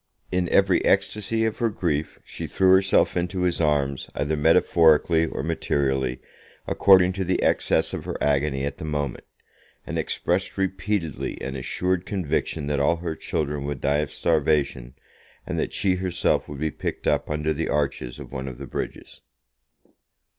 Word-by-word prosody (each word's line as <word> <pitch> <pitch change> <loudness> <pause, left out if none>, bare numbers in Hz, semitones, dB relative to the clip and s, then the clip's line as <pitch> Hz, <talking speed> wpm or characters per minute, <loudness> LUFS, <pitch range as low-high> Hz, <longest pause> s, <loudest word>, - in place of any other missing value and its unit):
In 90 -1 0
every 95 -2 +3
ecstasy 105 +3 +1
of 110 -1 -2
her 115 -2 +2
grief 80 -7 -2
she - - -6
threw 95 -1 +3
herself 95 +1 +4
into 90 +1 -1
his 90 -1 0
arms, 70 -3 0
either 75 +2 0
metaphorically 80 0 +4
or - - -4
materially, 65 -3 -1 0.5
according 95 -2 +5
to 95 0 -2
the 95 0 0
excess - - +2
of - - -5
her - - -4
agony 70 -1 +1
at 70 - -5
the - - -6
moment, 75 -4 -3 0.6
and - - -3
expressed 90 +3 -1
repeatedly 95 -4 -2
an 65 0 -5
assured 90 +7 -1
conviction 80 -5 -2
that 70 -1 -1
all 70 +4 +3
her 85 -1 -4
children 75 -3 -3
would 70 -2 -3
die 70 +1 +1
of 75 -2 -2
starvation, 70 -6 0 0.5
and - - -3
that - - -1
she 95 -2 +1
herself 90 -1 0
would 70 - -7
be 80 0 -1
picked - - -5
up - - +1
under 75 +1 0
the 80 +2 -3
arches 65 -4 -1
of - - -10
one 65 0 -5
of 65 -2 -7
the 70 - -7
bridges. - - -6
80 Hz, 165 wpm, -24 LUFS, 70-90 Hz, 0.6 s, according